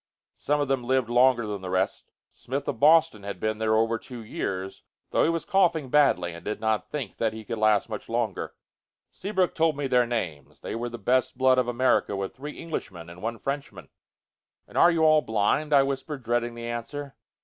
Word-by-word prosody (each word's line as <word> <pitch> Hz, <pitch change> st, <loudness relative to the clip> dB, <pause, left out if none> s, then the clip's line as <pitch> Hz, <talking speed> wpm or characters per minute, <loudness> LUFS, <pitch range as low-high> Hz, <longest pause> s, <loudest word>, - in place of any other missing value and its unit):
Some 150 Hz, 0 st, -1 dB
of 145 Hz, -, 0 dB
them 135 Hz, -2 st, 0 dB
lived 130 Hz, -1 st, +1 dB
longer 120 Hz, -1 st, +4 dB
than 105 Hz, -2 st, -4 dB
the 95 Hz, -, -6 dB
rest. 95 Hz, +1 st, -1 dB, 0.2 s
Smith 135 Hz, +3 st, -5 dB
of 120 Hz, -, -3 dB
Boston 155 Hz, -6 st, +5 dB
had 100 Hz, 0 st, -6 dB
been 110 Hz, 0 st, -1 dB
there 110 Hz, 0 st, +2 dB
over 115 Hz, +1 st, +1 dB
two 120 Hz, -3 st, -9 dB
years, 95 Hz, -3 st, -4 dB, 0.3 s
though -, -, +3 dB
he -, -, +3 dB
was 165 Hz, -1 st, -2 dB
coughing 170 Hz, -8 st, +2 dB
badly 105 Hz, -12 st, +3 dB
and 85 Hz, 0 st, -10 dB
did 105 Hz, -, -4 dB
not 110 Hz, -2 st, -1 dB
think 135 Hz, -9 st, -5 dB
that 110 Hz, -1 st, 0 dB
he 110 Hz, 0 st, -9 dB
could 115 Hz, -1 st, -4 dB
last 110 Hz, -1 st, +3 dB
much 110 Hz, -3 st, -7 dB
longer. 115 Hz, -4 st, -2 dB, 0.6 s
Seabrook 190 Hz, -3 st, -1 dB
told 160 Hz, -3 st, +1 dB
me 145 Hz, -, -2 dB
their 125 Hz, -2 st, +3 dB
names. 75 Hz, -, -4 dB
They -, -, -5 dB
were 120 Hz, +1 st, -3 dB
the 120 Hz, -, -7 dB
best 125 Hz, +4 st, +1 dB
blood 130 Hz, 0 st, +4 dB
of 125 Hz, -, +1 dB
America, 120 Hz, -4 st, +1 dB
with 95 Hz, -1 st, -4 dB
three 150 Hz, +3 st, -8 dB
Englishmen 90 Hz, -, -6 dB
and 90 Hz, +1 st, -12 dB
one 115 Hz, +1 st, -3 dB
Frenchman. 140 Hz, +4 st, -5 dB, 0.8 s
"And -, -, -17 dB
are 175 Hz, -, +6 dB
you 165 Hz, -2 st, +1 dB
all 155 Hz, -1 st, +6 dB
blind?" 110 Hz, +8 st, 0 dB
I 140 Hz, -2 st, +6 dB
whispered, 135 Hz, 0 st, -4 dB
dreading 120 Hz, 0 st, -1 dB
the 115 Hz, 0 st, -7 dB
answer. 125 Hz, +5 st, -5 dB
120 Hz, 205 wpm, -26 LUFS, 110-140 Hz, 0.8 s, are